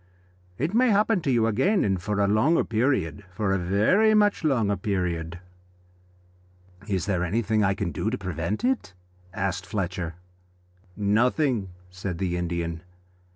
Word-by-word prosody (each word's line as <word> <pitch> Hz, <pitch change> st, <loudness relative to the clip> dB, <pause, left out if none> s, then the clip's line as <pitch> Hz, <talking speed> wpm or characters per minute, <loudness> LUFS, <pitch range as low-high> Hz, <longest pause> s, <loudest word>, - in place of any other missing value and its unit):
It 155 Hz, -, -1 dB
may 250 Hz, +2 st, +4 dB
happen 210 Hz, -1 st, +3 dB
to 145 Hz, -, -2 dB
you 115 Hz, -3 st, +3 dB
again, 185 Hz, -, +2 dB
and 95 Hz, -3 st, 0 dB
for 105 Hz, +2 st, -2 dB
a 100 Hz, -, +3 dB
longer 110 Hz, +11 st, +3 dB
period 110 Hz, -, 0 dB
for 95 Hz, +2 st, -1 dB
a 95 Hz, -, +1 dB
very 110 Hz, -, +3 dB
much 205 Hz, -3 st, +3 dB
longer 115 Hz, -9 st, +2 dB
period." 90 Hz, -6 st, -2 dB, 1.5 s
"Is 95 Hz, -4 st, -1 dB
there 95 Hz, -4 st, 0 dB
anything 110 Hz, +3 st, +1 dB
I 95 Hz, 0 st, +2 dB
can 95 Hz, -4 st, -2 dB
do 105 Hz, -, -2 dB
to 125 Hz, -, -2 dB
prevent 90 Hz, +1 st, -3 dB
it?" 250 Hz, -, -1 dB, 0.4 s
asked 95 Hz, -1 st, -3 dB
Fletcher. 90 Hz, -4 st, -3 dB, 0.8 s
"Nothing," 110 Hz, +2 st, +1 dB, 0.2 s
said 90 Hz, -1 st, -5 dB
the 90 Hz, -1 st, -1 dB
Indian. 85 Hz, -2 st, -3 dB
100 Hz, 145 wpm, -25 LUFS, 90-125 Hz, 1.5 s, may